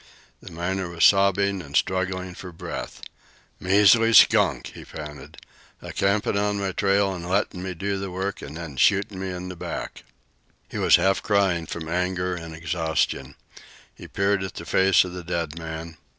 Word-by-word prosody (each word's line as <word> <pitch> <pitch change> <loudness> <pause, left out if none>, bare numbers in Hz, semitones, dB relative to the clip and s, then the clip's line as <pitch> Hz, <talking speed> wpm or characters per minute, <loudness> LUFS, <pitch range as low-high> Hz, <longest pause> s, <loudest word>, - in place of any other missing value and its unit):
The - - -11
miner 90 +2 -3
was 85 -1 +2
sobbing 100 0 +3
and 70 -3 -9
struggling 95 -1 -1
for 90 0 -9
breath. 85 - -7 0.6
"Measly 105 +4 +5
skunk!" - - +5
he - - -10
panted; 75 -1 -10 0.4
"a - - -9
campin' 100 +1 +1
on 100 0 0
my 100 -1 -1
trail 100 0 +1
an' 90 -2 -7
lettin' 95 0 -1
me 95 -1 -5
do 100 +3 -2
the 95 0 -4
work, 95 +3 -4
an' 70 +2 -8
then 80 -5 -8
shootin' 100 +4 +2
me 95 0 -4
in 90 0 -6
the 90 - -7
back!" - - -6 0.6
He - - -6
was - - +6
half 95 0 +2
crying 95 -5 +1
from 80 -1 -6
anger 90 +1 -1
and 80 -2 -7
exhaustion. 80 -4 -2 0.6
He - - -12
peered 100 0 0
at 95 -1 -5
the 85 - -7
face 95 +2 +4
of 90 -1 -7
the 90 -1 -7
dead 85 -2 -3
man. 80 0 -7
90 Hz, 175 wpm, -24 LUFS, 85-100 Hz, 0.6 s, was